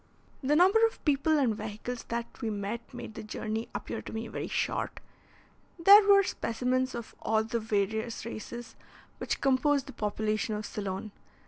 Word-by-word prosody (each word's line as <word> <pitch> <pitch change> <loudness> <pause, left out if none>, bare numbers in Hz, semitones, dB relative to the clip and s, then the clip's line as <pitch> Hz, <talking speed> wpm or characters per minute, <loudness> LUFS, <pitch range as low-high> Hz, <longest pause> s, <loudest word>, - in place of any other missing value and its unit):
The 285 +2 +2
number 380 +7 +5
of 450 - -12
people 300 +1 +3
and 250 -7 +2
vehicles 220 +3 -5
that 235 0 -2 0.2
we 225 - -1
met 210 +3 -4
made - - -8
the - - -7
journey 220 +1 -4
appear 205 - -4
to - - -9
me 225 +1 -4
very - - -4
short. - - -2 0.8
There 395 +5 +9
were 400 -1 +7
specimens 255 -3 -1
of 235 -1 -7
all 220 0 +2
the 230 +1 -2
various 220 +2 -1
races 235 +1 -7 0.4
which - - -2
compose 275 +1 +3
the 270 0 -10
population 215 0 -1
of 210 0 -4
Ceylon. 200 +1 -4
230 Hz, 160 wpm, -30 LUFS, 215-270 Hz, 0.8 s, There